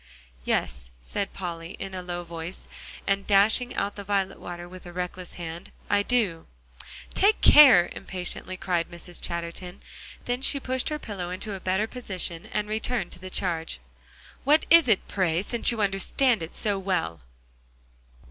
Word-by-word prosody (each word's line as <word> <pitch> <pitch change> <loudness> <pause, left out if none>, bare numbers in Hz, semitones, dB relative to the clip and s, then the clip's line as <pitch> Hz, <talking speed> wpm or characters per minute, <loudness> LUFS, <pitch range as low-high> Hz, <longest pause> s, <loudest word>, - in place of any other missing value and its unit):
"Yes," - - -1
said 195 - -3
Polly, 170 -1 -6
in 195 - -6
a 185 - -4
low 175 -1 -5
voice, 170 +1 -7 0.4
and 195 0 0
dashing 215 +5 +4
out 200 0 -1
the 200 - -6
violet 195 -1 -1
water 175 0 -7
with 180 0 -11
a - - -8
reckless 180 0 -5
hand, 170 +1 -7 0.2
"I 205 0 +4
do." 205 -8 0 0.7
"Take 415 +3 +4
care," 230 -13 +9
impatiently 185 0 -4
cried 175 -3 -1
Mrs. 170 0 -8
Chatterton. 170 +2 -5 0.4
Then 245 +1 -1
she 280 +1 +4
pushed 260 -1 -1
her 300 - -2
pillow 200 -10 -5
into 185 +3 -4
a 195 - -5
better 190 +3 0
position, 190 -6 -5
and 210 -1 -2
returned 220 -2 -2
to - - -6
the 185 +1 -7
charge. 165 - -1 0.6
"What 300 +3 +4
is 335 -4 +8
it, 215 -5 +2
pray, 180 -3 0
since 235 +3 +1
you 230 -2 0
understand 205 +4 +2
it 160 - -7
so 205 -2 0
well?" 180 - -1
190 Hz, 160 wpm, -26 LUFS, 175-215 Hz, 0.7 s, care